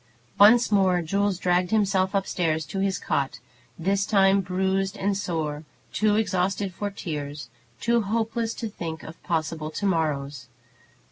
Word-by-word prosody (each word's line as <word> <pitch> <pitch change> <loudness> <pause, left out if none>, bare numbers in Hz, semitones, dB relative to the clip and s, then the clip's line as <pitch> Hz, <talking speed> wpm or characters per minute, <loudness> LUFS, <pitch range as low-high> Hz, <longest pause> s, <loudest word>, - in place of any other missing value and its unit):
Once 220 +3 +7
more 185 -3 +3
Jules 200 +3 0
dragged 180 0 +1
himself 195 -2 +1
up 195 -1 +1
stairs 160 -4 -1
to 175 +7 -5
his 195 -1 0
cot, 135 -2 -1 0.4
this 195 +4 +1
time 195 -2 +4
bruised 190 +1 -1
and 200 +1 0
sore, 160 -6 -3 0.3
too 215 -1 +2
exhausted 195 -2 0
for 205 +3 -3
tears, 150 -8 -6 0.3
too 235 0 +2
hopeless 225 +2 -1
to 230 - -4
think 165 -6 -6
of 160 - -11
possible 160 -1 -2
to 180 +6 -4
morrows. 145 -7 -1
190 Hz, 145 wpm, -25 LUFS, 160-200 Hz, 0.4 s, Once